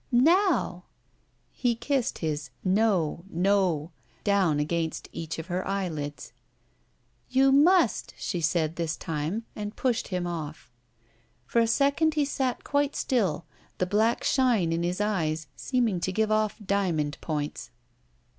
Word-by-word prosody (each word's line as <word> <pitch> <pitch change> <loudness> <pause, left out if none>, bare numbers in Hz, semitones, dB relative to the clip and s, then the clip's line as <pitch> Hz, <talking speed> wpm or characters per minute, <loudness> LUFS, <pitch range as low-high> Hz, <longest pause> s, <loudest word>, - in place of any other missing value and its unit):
"Now!" 265 - +3 0.7
He 245 -2 0
kissed 255 +2 -1
his 150 0 -2
"No, 185 -5 +1
No," 180 -3 +1 0.3
down 190 -7 +2
against 160 +1 -2
each 165 -1 -5
of 160 - -5
her 180 +1 -2
eyelids. 160 -7 -4 1.0
"You 270 +1 +4
must," 310 - +4
she 175 - -3
said 160 -1 0
this 165 -1 -2
time, 165 +8 -3
and 210 0 -5
pushed 250 -3 0
him 180 -2 -2
off. 155 -6 -6 0.7
For 235 - +1
a 230 - +4
second 285 +6 +2
he 295 -2 +2
sat 265 -3 -2
quite 285 0 0
still, 185 - 0 0.3
the 185 - +1
black 215 +5 +1
shine 235 -11 +2
in 165 - 0
his 175 +2 -1
eyes 165 -7 0
seeming 235 -8 0
to 190 - -1
give 215 +2 0
off 215 -1 +1
diamond 175 -7 0
points. 150 -5 -3
190 Hz, 135 wpm, -27 LUFS, 165-235 Hz, 1.0 s, You